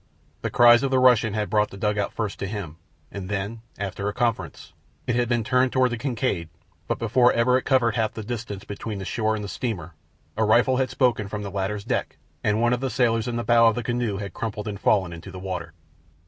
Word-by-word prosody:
The -, -, -2 dB
cries 120 Hz, -1 st, +6 dB
of 135 Hz, -, 0 dB
the 130 Hz, -, +2 dB
Russian 125 Hz, -4 st, +4 dB
had 105 Hz, -1 st, -1 dB
brought 105 Hz, -1 st, +2 dB
the 100 Hz, -, -10 dB
dugout 105 Hz, 0 st, 0 dB
first 110 Hz, -3 st, -4 dB
to 100 Hz, -, -3 dB
him, 95 Hz, -6 st, -6 dB, 0.3 s
and 95 Hz, -2 st, -6 dB
then, 105 Hz, +3 st, -3 dB, 0.2 s
after 100 Hz, 0 st, -4 dB
a -, -, -5 dB
conference, 120 Hz, -2 st, -2 dB, 0.3 s
it 120 Hz, -, 0 dB
had 120 Hz, -1 st, +1 dB
been 120 Hz, -2 st, +1 dB
turned 130 Hz, +2 st, +2 dB
toward 130 Hz, -1 st, +2 dB
the 120 Hz, -, -2 dB
Kincaid, 120 Hz, -, -2 dB, 0.4 s
but -, -, -1 dB
before 120 Hz, +2 st, +3 dB
ever 115 Hz, +2 st, +3 dB
it 130 Hz, -, 0 dB
covered 125 Hz, -4 st, +3 dB
half 110 Hz, -2 st, 0 dB
the 110 Hz, -, -5 dB
distance 105 Hz, -3 st, -5 dB
between 105 Hz, +1 st, -6 dB
the 95 Hz, -, -6 dB
shore 110 Hz, +1 st, 0 dB
and 105 Hz, -, -5 dB
the -, -, -4 dB
steamer 95 Hz, -7 st, -4 dB, 0.4 s
a 110 Hz, -, +1 dB
rifle 120 Hz, +4 st, +4 dB
had 130 Hz, 0 st, +1 dB
spoken 120 Hz, -6 st, +1 dB
from 105 Hz, +1 st, -5 dB
the 100 Hz, -, -5 dB
latter's 100 Hz, +1 st, -2 dB
deck -, -, -2 dB, 0.3 s
and 105 Hz, +1 st, +2 dB
one 120 Hz, +1 st, +3 dB
of 125 Hz, -, 0 dB
the 135 Hz, +1 st, -2 dB
sailors 115 Hz, -2 st, +1 dB
in 120 Hz, -, -2 dB
the 120 Hz, -, -2 dB
bow 115 Hz, +1 st, +5 dB
of 115 Hz, -, +3 dB
the 120 Hz, -, -3 dB
canoe 120 Hz, -3 st, -1 dB
had 100 Hz, -3 st, -6 dB
crumpled 105 Hz, -2 st, -4 dB
and 100 Hz, -2 st, -4 dB
fallen 95 Hz, -5 st, +2 dB
into 85 Hz, 0 st, -9 dB
the -, -, -9 dB
water. 90 Hz, -3 st, -5 dB
110 Hz, 235 wpm, -24 LUFS, 100-120 Hz, 0.4 s, cries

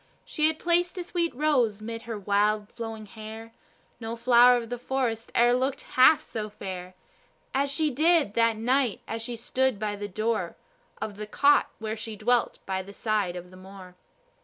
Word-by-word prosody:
She 305 Hz, -1 st, +1 dB
had 315 Hz, 0 st, -1 dB
placed 350 Hz, +2 st, +1 dB
a 360 Hz, -, -2 dB
sweet 340 Hz, -1 st, -1 dB
rose 250 Hz, -8 st, +2 dB
'mid 230 Hz, +1 st, -6 dB
her 225 Hz, -, -3 dB
wild 205 Hz, +1 st, +1 dB
flowing 225 Hz, -2 st, -6 dB
hair; 220 Hz, +2 st, -10 dB, 0.5 s
No 225 Hz, 0 st, -5 dB
flower 245 Hz, +1 st, +6 dB
of 235 Hz, -1 st, -6 dB
the 245 Hz, -, -3 dB
forest 245 Hz, -3 st, -2 dB
e'er 240 Hz, +1 st, +5 dB
looked 260 Hz, +2 st, 0 dB
half 260 Hz, +4 st, +6 dB
so 215 Hz, -2 st, -5 dB
fair 185 Hz, -3 st, -7 dB, 0.6 s
As 280 Hz, +1 st, +1 dB
she 305 Hz, +2 st, 0 dB
did 310 Hz, -3 st, +3 dB
that 230 Hz, -1 st, +2 dB
night, 250 Hz, 0 st, +1 dB
as 225 Hz, 0 st, -4 dB
she 240 Hz, +1 st, -5 dB
stood 255 Hz, +1 st, 0 dB
by 210 Hz, 0 st, -2 dB
the 205 Hz, 0 st, -5 dB
door 215 Hz, +3 st, -2 dB, 0.4 s
Of 205 Hz, -2 st, -5 dB
the 210 Hz, 0 st, -6 dB
cot 285 Hz, +6 st, +4 dB
where 220 Hz, 0 st, -4 dB
she 220 Hz, 0 st, -6 dB
dwelt 240 Hz, +3 st, +1 dB
by 190 Hz, -1 st, -2 dB
the 200 Hz, +2 st, -11 dB
side 205 Hz, -5 st, -1 dB
of 180 Hz, 0 st, -8 dB
the 185 Hz, -, -13 dB
moor. 185 Hz, -1 st, -12 dB
230 Hz, 185 wpm, -27 LUFS, 210-260 Hz, 0.6 s, flower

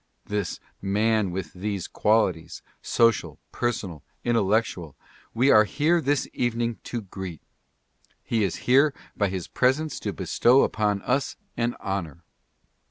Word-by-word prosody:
This 105 Hz, -4 st, -3 dB, 0.2 s
man 105 Hz, +1 st, +1 dB
with 90 Hz, 0 st, -5 dB
these 100 Hz, 0 st, -3 dB
qualities 105 Hz, -6 st, 0 dB
— -, -, -45 dB, 0.2 s
social, 115 Hz, -2 st, +3 dB
personal, 100 Hz, -10 st, -3 dB, 0.2 s
intellectual 105 Hz, -, 0 dB, 0.2 s
— -, -, -28 dB
we 130 Hz, +4 st, +4 dB
are 110 Hz, -, +7 dB
here 160 Hz, +9 st, +2 dB
this 145 Hz, -2 st, 0 dB
evening 120 Hz, -1 st, -1 dB
to 120 Hz, -, -4 dB
greet. 95 Hz, -4 st, -8 dB, 0.8 s
He 115 Hz, -2 st, 0 dB
is 95 Hz, -, 0 dB
here 140 Hz, +3 st, +4 dB, 0.2 s
by 100 Hz, -, +1 dB
his 95 Hz, -2 st, -4 dB
presence 140 Hz, +5 st, +1 dB
to -, -, -3 dB
bestow 125 Hz, +3 st, +3 dB
upon 105 Hz, -2 st, 0 dB
us 135 Hz, +3 st, 0 dB, 0.2 s
an 120 Hz, 0 st, -1 dB
honor. 90 Hz, -4 st, -4 dB
110 Hz, 135 wpm, -25 LUFS, 95-120 Hz, 0.8 s, are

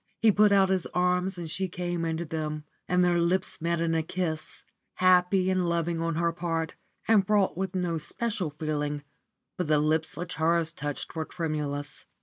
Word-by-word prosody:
He 225 Hz, -, +5 dB
put 210 Hz, +1 st, +5 dB
out 195 Hz, -1 st, +5 dB
his 190 Hz, -2 st, +1 dB
arms 180 Hz, +1 st, +1 dB
and 170 Hz, -2 st, -5 dB
she 185 Hz, +4 st, -1 dB
came 175 Hz, -1 st, -3 dB
into 165 Hz, +1 st, -2 dB
them, 155 Hz, -1 st, -3 dB, 0.2 s
and 180 Hz, 0 st, +3 dB
their 175 Hz, -1 st, +3 dB
lips 180 Hz, +1 st, 0 dB
met 170 Hz, 0 st, 0 dB
in 165 Hz, 0 st, +1 dB
a 165 Hz, -, +2 dB
kiss, 160 Hz, -1 st, -4 dB, 0.3 s
happy 185 Hz, +1 st, +4 dB
and 185 Hz, -2 st, +1 dB
loving 170 Hz, 0 st, 0 dB
on 165 Hz, -1 st, -1 dB
her 170 Hz, +1 st, +1 dB
part, 165 Hz, -1 st, -2 dB, 0.3 s
and 220 Hz, -3 st, +5 dB
fraught 205 Hz, -6 st, +3 dB
with 190 Hz, +1 st, -3 dB
no 175 Hz, -3 st, 0 dB
special 200 Hz, +1 st, -2 dB
feeling, 150 Hz, -1 st, -3 dB, 0.5 s
but 180 Hz, -, -1 dB
the 155 Hz, 0 st, +4 dB
lips 155 Hz, +2 st, +1 dB
which 175 Hz, +1 st, -5 dB
hers 165 Hz, 0 st, +3 dB
touched 145 Hz, 0 st, -5 dB
were 160 Hz, -, -1 dB
tremulous. 150 Hz, -4 st, -4 dB
170 Hz, 180 wpm, -28 LUFS, 160-180 Hz, 0.5 s, He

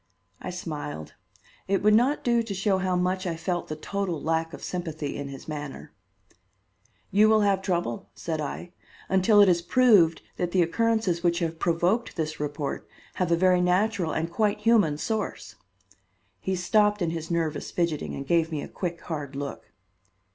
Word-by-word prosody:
I -, -, -5 dB
smiled. 150 Hz, -, -6 dB, 0.5 s
It 195 Hz, 0 st, +1 dB
would 210 Hz, 0 st, +5 dB
not 250 Hz, +7 st, +3 dB
do 235 Hz, -1 st, +3 dB
to 225 Hz, -3 st, -4 dB
show 190 Hz, 0 st, +1 dB
how 185 Hz, -1 st, 0 dB
much 185 Hz, +1 st, 0 dB
I 170 Hz, -, -1 dB
felt 175 Hz, +1 st, -3 dB
the 155 Hz, -, -4 dB
total 185 Hz, +1 st, -3 dB
lack 165 Hz, +1 st, -1 dB
of -, -, -10 dB
sympathy 160 Hz, -5 st, -4 dB
in 140 Hz, -, -5 dB
his 135 Hz, -1 st, -9 dB
manner. 150 Hz, -2 st, -7 dB, 1.2 s
"You 210 Hz, +3 st, +5 dB
will 220 Hz, -1 st, +5 dB
have 200 Hz, -2 st, +2 dB
trouble," 175 Hz, -, -2 dB
said 160 Hz, -2 st, -3 dB
I, 170 Hz, +4 st, -5 dB, 0.4 s
"until 190 Hz, +3 st, +5 dB
it 200 Hz, -, +7 dB
is 175 Hz, -2 st, +3 dB
proved 195 Hz, -7 st, +4 dB
that 175 Hz, -1 st, -2 dB
the 185 Hz, -2 st, +4 dB
occurrences 220 Hz, -1 st, +1 dB
which 170 Hz, -1 st, +2 dB
have 165 Hz, -2 st, -2 dB
provoked 175 Hz, +7 st, +1 dB
this 155 Hz, -1 st, -3 dB
report 145 Hz, -1 st, -4 dB, 0.3 s
have 180 Hz, -2 st, +1 dB
a -, -, +6 dB
very 180 Hz, +1 st, +3 dB
natural 180 Hz, -1 st, +1 dB
and 165 Hz, +2 st, -2 dB
quite 210 Hz, +2 st, 0 dB
human 210 Hz, -10 st, +3 dB
source." 220 Hz, +6 st, -3 dB, 0.8 s
He 190 Hz, -, -2 dB
stopped 210 Hz, +2 st, +2 dB
in 165 Hz, -, 0 dB
his 165 Hz, -1 st, -5 dB
nervous 165 Hz, -3 st, -1 dB
fidgeting 170 Hz, -4 st, -2 dB
and 140 Hz, -, -6 dB
gave 165 Hz, +2 st, +2 dB
me 150 Hz, -2 st, -3 dB
a -, -, -6 dB
quick 175 Hz, -2 st, -4 dB
hard 145 Hz, -4 st, -5 dB
look. 140 Hz, 0 st, -6 dB
175 Hz, 175 wpm, -26 LUFS, 160-200 Hz, 1.2 s, it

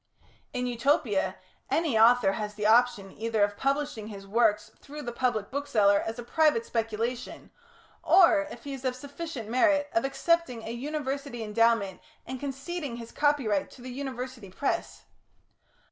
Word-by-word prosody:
In 250 Hz, -1 st, -2 dB
Utopia, 240 Hz, -4 st, +1 dB, 0.3 s
any 320 Hz, -7 st, +1 dB
author 225 Hz, -2 st, +6 dB
has 210 Hz, 0 st, -4 dB
the 210 Hz, 0 st, -3 dB
option 220 Hz, -3 st, +3 dB
either 225 Hz, 0 st, 0 dB
of 205 Hz, 0 st, +1 dB
publishing 275 Hz, -3 st, -1 dB
his 200 Hz, -2 st, -9 dB
works 210 Hz, 0 st, +2 dB
through 295 Hz, +1 st, -9 dB
the 240 Hz, -, -4 dB
public 235 Hz, -4 st, -1 dB
bookseller 220 Hz, -8 st, +3 dB
as 225 Hz, +1 st, -4 dB
a 240 Hz, -, -6 dB
private 295 Hz, -2 st, +2 dB
speculation, 230 Hz, +2 st, -3 dB, 0.5 s
or, 335 Hz, -5 st, +5 dB
if -, -, -10 dB
he 285 Hz, -2 st, -5 dB
is 270 Hz, -1 st, -8 dB
of 255 Hz, -1 st, -1 dB
sufficient 285 Hz, -2 st, -7 dB
merit, 290 Hz, +4 st, +2 dB
of 340 Hz, -, +2 dB
accepting 270 Hz, -3 st, 0 dB
a 225 Hz, -, -5 dB
University 275 Hz, -1 st, -4 dB
endowment 220 Hz, -2 st, +1 dB, 0.2 s
and 260 Hz, +1 st, -6 dB
conceding 285 Hz, +1 st, -4 dB
his 230 Hz, -1 st, -9 dB
copyright 275 Hz, -9 st, +1 dB
to 245 Hz, -, -14 dB
the 255 Hz, -, -7 dB
University 255 Hz, -4 st, -6 dB
press. 270 Hz, +9 st, -3 dB
245 Hz, 150 wpm, -28 LUFS, 220-285 Hz, 0.5 s, author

